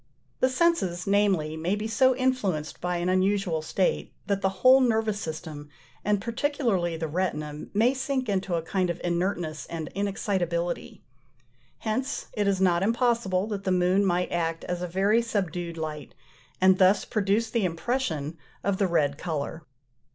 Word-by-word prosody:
The 255 - +3
senses, 255 - +1
namely, 195 -6 +2
may 170 +5 0
be 210 +1 -3
so 260 +3 +3
influenced 215 - -1
by 180 0 -1
an 175 +1 -1
unusual 185 -2 +1
state, 180 +4 0
that 200 -1 -1
the 190 - +2 0.2
whole 260 +1 +8
nervous 220 -4 +1
system, 155 -4 -6 0.3
and 205 0 +2
particularly 230 - -1
the 160 0 -3
retina, 150 -3 -3
may 235 +5 +4
sink 265 -1 -2
into 190 -3 0
a 165 - -1
kind 185 +1 0
of 170 0 -3
inertness 175 -3 -2
and 160 -2 -5
inexcitability. 190 -4 -2 0.8
Hence 255 +6 -3
it 205 -1 0
is 195 -1 +2
not 175 -2 +3
impossible 230 -4 +1
that 200 -2 -4
the 190 - 0
moon 180 +2 +3
might 180 -2 +1
act 165 -1 -1
as 180 0 -3
a 180 - -2
very 195 +6 +2
subdued 180 -7 -3
light, 155 -3 -5 0.4
and 190 0 +5
thus 190 +2 +4
produce 215 +2 0
the 230 -2 +1
impression 165 - -2 0.2
of 200 -1 0
the 195 - +3
red 145 -4 +1
colour. 160 -1 -4
190 Hz, 160 wpm, -27 LUFS, 170-215 Hz, 0.8 s, whole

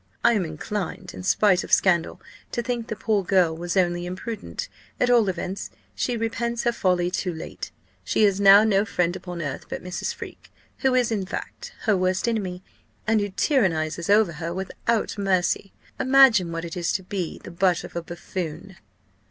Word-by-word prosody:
I 235 - +5
am 200 -5 +1
inclined, 180 +3 -5
in - - -8
spite 190 0 +3
of - - -10
scandal, 175 -4 +3 0.3
to 240 - -1
think 240 -2 -3
the 220 - -4
poor 210 -2 0
girl 180 -3 +3
was 175 +3 -3
only 175 -1 +1
imprudent: 205 +4 -5 0.3
at 245 - +3
all 230 -5 +5
events, 185 +2 -4 0.2
she 230 - -1
repents 230 +1 -2
her 240 - +3
folly 180 -5 +1
too 185 0 -1
late. 160 -1 -7 0.3
She - - +1
has 200 -1 +3
now 200 +1 +8
no 205 -2 +3
friend 180 -4 0
upon 175 -2 -6
earth 140 -2 -5
but - - -5
Mrs. 180 0 -3
Freke, - - -10 0.3
who 265 -2 +2
is, 245 -2 +2
in 200 -4 -1
fact, 485 - -6
her 215 -3 +2
worst 185 +3 0
enemy, 190 -6 -2 0.4
and 220 0 +3
who 205 - -2
tyrannizes 170 - 0
over 205 -3 +5
her 165 +1 -5
without 205 +4 -2
mercy. 195 0 +1 0.3
Imagine 260 -10 +5
what 165 0 -4
it 170 - -6
is 175 -2 -1
to 190 - -1
be 185 -2 -4
the - - -11
butt 180 0 +1
of - - -10
a 170 - -1
buffoon!" 175 +1 -6
190 Hz, 185 wpm, -24 LUFS, 175-220 Hz, 0.4 s, now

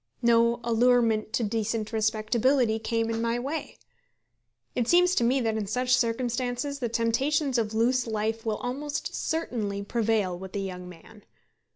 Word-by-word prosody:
No 235 0 +4
allurement 230 -2 +2
to 240 - +1
decent 220 0 -2
respectability 220 +2 +1
came 230 0 -1
in 225 0 -2
my 230 +1 0
way. 280 +6 -4 1.0
It 245 -2 -1
seems 360 +3 +5
to 240 - +2
me 255 +3 +3
that 225 -2 0
in 210 -2 -3
such 250 +4 +2
circumstances 245 +3 -1
the 240 -3 -2
temptations 260 +4 +1
of 220 -1 -2
loose 245 +2 +2
life 220 +1 -2
will 220 -2 -1
almost 285 +4 -4
certainly 220 -11 -2
prevail 215 -4 0
with 190 +2 -9
a - - -1
young 180 -2 -6
man. 195 +5 -15
230 Hz, 155 wpm, -27 LUFS, 220-250 Hz, 1.0 s, seems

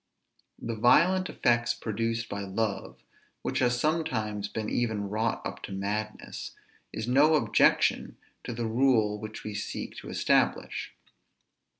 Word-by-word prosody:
The 115 - -4
violent 180 +11 +4
effects 120 -2 +2
produced 115 +1 -2
by 100 0 -4
love, 100 0 -3 0.4
which - - -1
has 120 -1 +2
sometimes 110 -10 -1
been 110 +1 -4
even 110 -4 -1
wrought 110 +2 -1
up - - -5
to - - -10
madness, 105 +2 -4 0.4
is 110 - -4
no 145 +5 +5
objection 115 -8 +3 0.3
to - - -4
the 120 0 -3
rule 110 -3 +2
which 110 0 -7
we 105 - -5
seek 105 - -5
to - - -8
establish. - - +1
110 Hz, 130 wpm, -28 LUFS, 105-120 Hz, 0.4 s, no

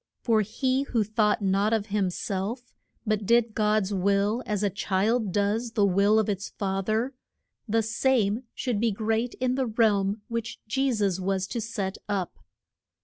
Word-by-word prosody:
For 225 -3 +3
he 255 +6 0
who 240 -5 0
thought 210 0 +1
not 200 +3 +2
of 220 -2 +1
him 200 -3 +2
self, 205 +7 -4 0.3
but 215 -2 -1
did 235 -1 +3
God's 210 -2 +1
will 200 +4 +1
as 210 -1 -1
a 200 - +1
child 210 +2 0
does 210 +4 0
the 205 -2 +3
will 200 +3 +3
of 220 - +2
its 200 -1 -2
fa 195 -1 -2
ther, 220 +6 0 0.6
the 225 +1 +2
same 225 -1 +1
should 245 -5 -1
be 230 0 +2
great 225 +3 -1
in 255 0 0
the 260 -1 0
realm 210 -2 +2
which 230 -1 -4
Je 265 +4 +1
sus 200 -5 0
was 190 0 -1
to 235 - -3
set 205 -3 -4
up. 195 -4 -1
215 Hz, 170 wpm, -27 LUFS, 200-230 Hz, 0.6 s, For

